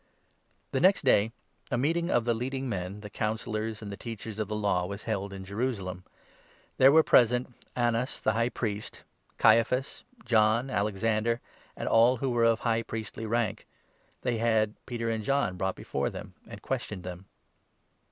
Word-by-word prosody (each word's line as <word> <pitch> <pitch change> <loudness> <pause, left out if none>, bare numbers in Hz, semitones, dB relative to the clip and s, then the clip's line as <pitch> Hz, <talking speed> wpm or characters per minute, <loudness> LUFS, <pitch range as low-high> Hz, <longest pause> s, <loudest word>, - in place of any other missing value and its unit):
The - - 0
next 190 +1 +4
day, 110 -3 +4 0.4
a 120 - 0
meeting 165 +6 +1
of 120 -7 +2
the 120 - +2
leading 130 +3 -3
men, 100 -2 -4
the 105 - -8
Councillors, 110 0 -2
5 - - -8
and 100 - -6
the 100 - -6
Teachers 110 -2 -7
of 110 - -1
the 105 - -3
Law 100 -4 +1
was 100 +2 -6
held 100 -3 -2
in 95 -1 -8
Jerusalem. 100 -4 -3 0.7
There 130 - +8
6 - - +4
were 160 - +8
present 125 0 +4 0.2
Annas 120 +1 0
the 110 - +2
High 115 +2 +1
Priest, 105 -4 -4 0.3
Caiaphas, 125 +3 +3 0.2
John, 115 +3 +3
Alex 100 -2 -1
ander, 115 +1 +1 0.4
and - - -4
all 120 +3 +5
who 130 +2 -1
were 120 -1 +3
of 115 0 +3
High 115 0 +1
Priestly 110 0 -5
rank. 115 -2 -1 0.6
They 120 -3 0
had 110 -2 +3
7 105 - -21
Peter 115 -2 -2
and 110 -1 -2
John 135 -7 +1
brought 95 +1 -1
before - - -2
them, - - -9
and - - -10
questioned 95 -4 -3
them. 90 +1 -7
115 Hz, 180 wpm, -29 LUFS, 105-120 Hz, 0.7 s, There